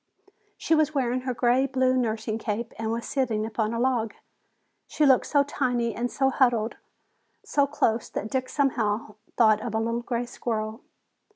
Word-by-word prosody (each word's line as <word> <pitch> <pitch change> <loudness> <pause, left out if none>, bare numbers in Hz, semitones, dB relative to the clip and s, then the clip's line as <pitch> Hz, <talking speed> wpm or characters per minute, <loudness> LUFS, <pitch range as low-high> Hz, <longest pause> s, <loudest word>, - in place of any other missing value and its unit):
She - - 0
was 310 -1 +2
wearing 255 -2 0
her - - 0
gray 250 +3 +3
blue 260 -1 +2
nursing 220 -2 -1
cape 225 +2 -3
and 220 0 -2
was 230 +1 -3
sitting 230 -6 0
upon 220 -1 -1
a 230 - -2
log. 235 -4 0 0.7
She 305 - +1
looked 265 -3 +4
so 285 -1 +3
tiny 245 -5 -1
and 240 - -2
was 265 +2 0
huddled 235 -4 +2 0.7
so 285 -1 +2
close 230 -5 0
that 215 - -5
Dick 255 -1 -1
somehow 225 -6 0 0.2
thought 215 -2 +5
of 220 -1 -4
a - - +2
little 230 +1 -1
gray 240 0 -2
squirrel. 220 -1 -4
240 Hz, 170 wpm, -26 LUFS, 220-260 Hz, 0.7 s, thought